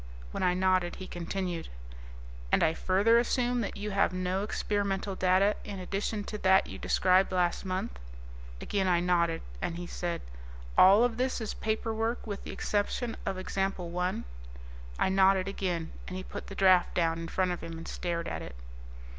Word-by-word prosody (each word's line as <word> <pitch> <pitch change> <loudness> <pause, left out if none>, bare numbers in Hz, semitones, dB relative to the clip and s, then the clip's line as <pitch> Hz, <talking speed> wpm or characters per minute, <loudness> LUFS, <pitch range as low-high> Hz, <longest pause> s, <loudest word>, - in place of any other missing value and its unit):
When - - -4
I 180 -1 +3
nodded 185 -1 +2
he 185 - -7
continued, 175 -1 -4 0.8
"And - - +4
I 160 - +3
further 200 +7 +3
assume 245 0 +1
that 210 - -4
you 210 +1 -4
have 195 - +2
no 185 +1 -1
experimental 200 -1 -1
data 190 +2 +3
in 200 -1 -6
addition 200 +3 -2
to 210 +1 -6
that 190 0 +5
you - - -8
described 185 +1 +3
last 180 +1 +1
month?" 185 - -3 0.6
Again 195 - -1
I 175 -2 +4
nodded, 170 -2 +1 0.2
and 170 - -2
he 175 - -5
said, 175 -1 -4 0.5
"All 200 +5 +7
of 240 -2 +1
this 255 +1 0
is 220 - -3
paperwork 225 +1 -2
with 205 -3 -5
the - - -6
exception 220 +3 -1
of 195 -1 -1
Example 185 -2 -2
I?" 180 +1 -1 0.7
I - - +2
nodded 190 0 +4
again, 180 -4 -2 0.2
and 185 - -5
he 185 - -5
put - - -8
the 195 - -8
draft 185 -2 +4
down 165 -1 +1
in 165 - -5
front 185 +2 0
of 175 - -4
him 165 0 -6
and 165 - -8
stared 170 -1 -3
at - - -4
it. 65 - -8
190 Hz, 180 wpm, -30 LUFS, 180-205 Hz, 0.8 s, All